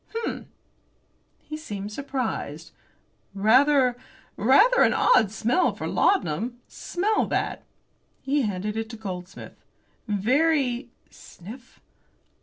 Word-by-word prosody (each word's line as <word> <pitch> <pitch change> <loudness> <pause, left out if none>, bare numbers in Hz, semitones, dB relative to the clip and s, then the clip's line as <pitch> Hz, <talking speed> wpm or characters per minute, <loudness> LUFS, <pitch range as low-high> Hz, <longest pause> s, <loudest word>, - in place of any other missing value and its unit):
"Hum!" 460 - -4 1.0
He 305 - -7
seemed 205 -9 -6
surprised. 220 - -4 0.6
"Rather 255 +5 +4 0.4
rather 410 - +5
an - - +4
odd 220 - +4
smell 235 - +1
for - - -6
laudanum. 235 - 0
Smell 420 +5 -1
that!" - - -2 0.6
He 280 +2 +1
handed 210 -2 -3
it 225 0 -3
to 230 - -8
Goldsmith. 185 -4 -8 0.5
"Very" 250 +4 +1 0.2
sniff! 230 +8 -13
240 Hz, 95 wpm, -25 LUFS, 205-285 Hz, 1.0 s, rather